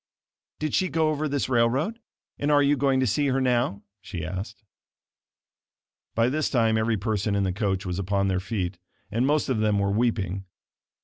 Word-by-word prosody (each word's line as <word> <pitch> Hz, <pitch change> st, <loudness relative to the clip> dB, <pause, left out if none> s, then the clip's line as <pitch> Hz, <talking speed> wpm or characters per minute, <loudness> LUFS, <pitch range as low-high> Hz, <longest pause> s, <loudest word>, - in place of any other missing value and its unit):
"Did 155 Hz, -1 st, -3 dB
she 185 Hz, -1 st, +2 dB
go 160 Hz, -1 st, +2 dB
over 155 Hz, 0 st, -1 dB
this 140 Hz, -1 st, -1 dB
railroad, 130 Hz, -, +1 dB, 0.4 s
and 145 Hz, -, 0 dB
are 145 Hz, -1 st, +5 dB
you 145 Hz, +1 st, +4 dB
going 135 Hz, -1 st, +2 dB
to -, -, +3 dB
see 140 Hz, +6 st, +1 dB
her 135 Hz, 0 st, +1 dB
now?" 120 Hz, -5 st, +1 dB, 0.2 s
she 90 Hz, -4 st, -6 dB
asked. 95 Hz, +6 st, -6 dB, 1.5 s
By 115 Hz, +1 st, +3 dB
this 150 Hz, +4 st, 0 dB
time 115 Hz, -4 st, +2 dB
every 110 Hz, 0 st, +1 dB
person 105 Hz, 0 st, -1 dB
in 100 Hz, -, +1 dB
the 95 Hz, -1 st, 0 dB
coach 95 Hz, -1 st, -1 dB
was 90 Hz, 0 st, -3 dB
upon 100 Hz, +1 st, 0 dB
their 95 Hz, -1 st, +1 dB
feet, 90 Hz, -2 st, -3 dB, 0.3 s
and 120 Hz, +5 st, +1 dB
most 150 Hz, +1 st, +2 dB
of 130 Hz, -5 st, 0 dB
them 105 Hz, -1 st, +2 dB
were 100 Hz, 0 st, +1 dB
weeping. 100 Hz, -4 st, 0 dB
115 Hz, 185 wpm, -26 LUFS, 100-135 Hz, 1.5 s, are